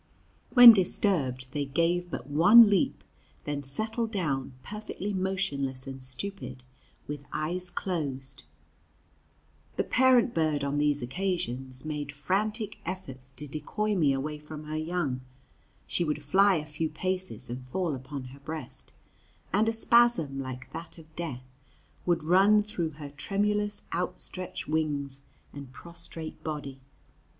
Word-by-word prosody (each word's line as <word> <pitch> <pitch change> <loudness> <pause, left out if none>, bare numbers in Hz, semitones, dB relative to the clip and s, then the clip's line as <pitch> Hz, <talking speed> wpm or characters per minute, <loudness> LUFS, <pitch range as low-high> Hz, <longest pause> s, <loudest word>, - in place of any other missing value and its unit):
When 245 -2 +13
disturbed, 170 - +1
they 145 0 -1
gave 170 +5 +1
but - - -5
one 205 +10 +8
leap, 195 - +1 0.4
then 145 -1 -3
settled 220 - -1
down, 145 - -1
perfectly 210 -1 -5
motionless 185 -9 -1
and 135 -1 -7
stupid, 130 -1 -5 0.4
with 145 -1 -6
eyes 175 +4 0
closed. 140 -8 -3 1.3
The - - +1
parent 255 -2 +4
bird, 155 -3 +1
on 140 +1 0
these 145 -2 +2
occasions, 130 -4 -3
made 150 -2 -3
frantic 210 - -1
efforts 135 -8 -6
to 150 +2 -6
decoy 185 +9 -2
me 155 -7 +3
away 150 +3 -2
from 150 0 -9
her 155 0 -5
young. 155 -5 -1 0.6
She 175 - 0
would 150 -2 -2
fly 195 +7 +5
a 155 -2 -2
few 155 +1 -2
paces 155 - -3
and 125 +1 -5
fall 165 +5 -2
upon 135 +1 -6
her 140 - -13
breast, 155 +2 -6 0.6
and 215 +3 +4
a - - +2
spasm, 225 -11 +3
like 130 -1 -6
that 165 +2 -6
of 160 -1 -16
death, 135 -7 -5 0.6
would 170 -3 +2
run 195 +6 +5
through 175 -7 -3
her 145 -2 -7
tremulous 205 +6 -1
outstretched 180 +1 -3
wings 145 -3 -1 0.3
and 140 -2 -9
prostrate 170 +1 -6
body. 145 -4 -5
155 Hz, 135 wpm, -29 LUFS, 140-190 Hz, 1.3 s, When